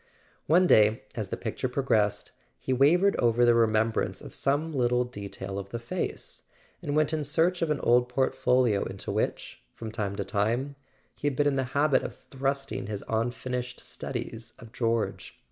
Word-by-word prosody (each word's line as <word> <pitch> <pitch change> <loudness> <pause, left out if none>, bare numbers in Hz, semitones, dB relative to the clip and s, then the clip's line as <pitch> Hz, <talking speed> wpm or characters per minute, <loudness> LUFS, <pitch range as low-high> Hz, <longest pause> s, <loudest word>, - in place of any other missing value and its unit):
One 175 +4 +5
day, 110 -7 +5
as - - -3
the - - -4
picture 130 - -3
progressed, 115 -6 0 0.3
he 130 - -2
wavered 170 +10 +4
over 120 0 +3
the 120 - +6
remembrance 110 -1 +2
of - - -11
some 145 +4 0
little 125 -3 +2
detail 100 -4 -6
of 100 0 -7
the 115 - -4
face, 115 0 -4 0.4
and 145 - -2
went 155 0 +2
in 155 -1 0
search 165 +5 +1
of 165 - +1
an 150 -2 0
old 125 +1 +3
portfolio 125 -3 +2
into - - -5
which, - - -2
from 110 -1 -6
time 105 -3 -3
to 100 - -2
time, 120 +9 0 0.4
he 145 - -3
had 140 - 0
been 145 - +2
in 145 -1 +2
the 135 -1 0
habit 145 -1 +4
of - - -6
thrusting 135 -2 -3
his 105 -1 -4
unfinished 125 +2 -2
studies 115 0 -6
of 115 -2 -13
George. 115 -2 -1
125 Hz, 175 wpm, -28 LUFS, 110-140 Hz, 0.4 s, the